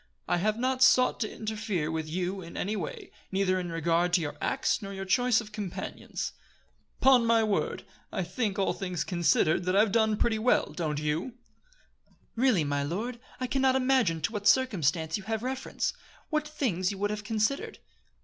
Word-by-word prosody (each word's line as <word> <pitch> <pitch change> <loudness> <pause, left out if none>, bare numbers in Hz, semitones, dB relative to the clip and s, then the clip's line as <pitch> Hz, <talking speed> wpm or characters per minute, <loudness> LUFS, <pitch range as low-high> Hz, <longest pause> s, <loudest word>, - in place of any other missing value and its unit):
I - - +2
have 215 +4 0
not 255 +1 0
sought 255 0 +5
to 215 - -2
interfere 210 -7 -3
with 160 -1 -3
you 185 +3 -2
in 170 -1 -9
any 210 +3 -1
way, 440 - -6 0.2
neither 190 -1 +1
in 175 -2 -4
regard 170 +2 +1
to 175 - +4
your 145 -2 -4
acts 270 - 0
nor 195 -1 -6
your 195 0 -5
choice 240 +4 +3
of 220 -2 -8
companions. 205 -4 -5 0.7
'Pon 260 -2 +6
my 230 -1 +4
word! 210 -2 -1 0.3
I 190 - -1
think, 195 +3 -2
all 195 - +1
things 180 -4 -3
considered, 170 -1 +2
that 185 +1 +1
I've 205 +1 +4
done 220 -1 +2
pretty 220 -1 +1
well, 245 +3 +2
don't 155 -4 -2
you?" 150 +10 -2 1.0
"Really, 235 -8 +3
my 145 -1 -1
lord, 215 - -3 0.2
I 255 - -1
can 265 +2 -1
not 265 -1 +4
imagine 255 -11 +2
to 230 - -1
what 205 -2 -2
circumstance 165 - +2
you 205 - -9
have 220 0 -2
reference 260 +1 -2 0.4
what 305 -1 0
things 220 - -1
you 200 - -4
would 205 +1 -1
have 210 0 -4
considered." 220 +5 -1
205 Hz, 185 wpm, -29 LUFS, 175-240 Hz, 1.0 s, Pon